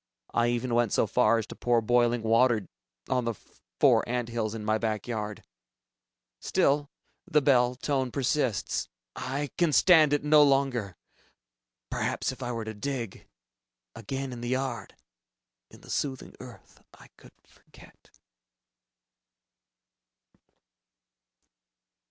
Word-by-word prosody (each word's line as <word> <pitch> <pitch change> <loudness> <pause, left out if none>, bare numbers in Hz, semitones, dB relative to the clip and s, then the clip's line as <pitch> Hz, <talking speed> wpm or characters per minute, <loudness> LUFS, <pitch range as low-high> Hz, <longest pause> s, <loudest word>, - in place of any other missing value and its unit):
I 120 0 +2
even 120 +1 -1
went 120 -3 +2
so - - +2
far 115 +1 +3
as 110 - -2
to - - -10
pour 120 -1 +2
boiling 120 0 +2
water 115 -2 +3 0.4
on 125 -2 0
the 115 -1 -2 0.4
four - - +5
ant 120 -1 -2
hills 115 -2 -3
in 105 -1 -6
my 110 +1 +1 0.3
yard. 105 -3 -5 1.0
Still... 145 +1 +1 0.4
the 150 - +3
bell 125 -3 +3
tone 130 0 -1
persists. 130 - -1 0.3
I 140 +2 -4
can 170 -3 +3
stand 155 -2 +6
it 145 -1 +1
no 150 0 +6
longer! 135 - +1 0.9
Perhaps - - -1
if - - -11
I 120 - -3
were 115 -2 -4
to 110 - -5
dig... 120 -1 -5 0.7
again 130 +4 -5
in 120 - -8
the 120 - -4
yard... 130 -1 -3 0.7
in - - -16
the - - -16
soothing 135 -3 -3
earth, - - -14
I - - -17
could - - -18
forget.... - - -20
120 Hz, 125 wpm, -28 LUFS, 115-135 Hz, 1.0 s, stand